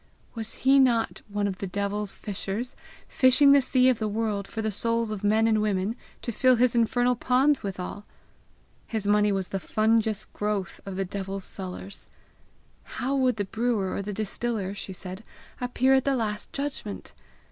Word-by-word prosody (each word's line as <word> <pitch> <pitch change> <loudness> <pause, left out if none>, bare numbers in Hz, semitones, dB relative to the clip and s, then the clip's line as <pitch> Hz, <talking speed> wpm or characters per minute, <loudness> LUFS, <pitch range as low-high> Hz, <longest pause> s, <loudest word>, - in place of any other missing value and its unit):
Was 225 -1 -4
he 270 +1 +4
not 240 -4 +2
one 205 0 -1
of 190 -2 -4
the 195 - -3
devil's 200 +2 -2
fishers, 205 +4 -5 0.3
fishing 270 +2 +5
the 280 0 +7
sea 255 0 +3
of 255 -3 +3
the 215 - 0
world 210 -2 -1
for 220 - -4
the 220 - 0
souls 230 +2 -1
of 210 -1 -5
men 215 +2 +3
and 220 -1 +3
women 205 +1 0 0.3
to 235 - -2
fill 255 +3 +4
his 245 0 +3
infernal 245 +1 +2
ponds 260 +4 +3
withal! 195 +1 -5 0.8
His 220 -3 -3
money 210 0 +4
was 195 -2 -2
the 195 - -2
fungous 220 +1 +1
growth 205 -3 -3
of 195 - -4
the 195 0 -1
devil's 195 +1 -5
cellars. 190 +1 -5 0.9
How 270 +2 0
would 255 -3 +2
the 205 -2 -2
brewer 220 -2 -1
or - - -2
the 205 +1 -4
distiller, 210 -1 -2
she 200 -1 -6
said, 185 +2 -7 0.4
appear 250 +1 +2
at 265 -1 +4
the 275 -1 +1
last 215 -3 -3
judgment! 275 -7 -5
215 Hz, 175 wpm, -27 LUFS, 200-245 Hz, 0.9 s, the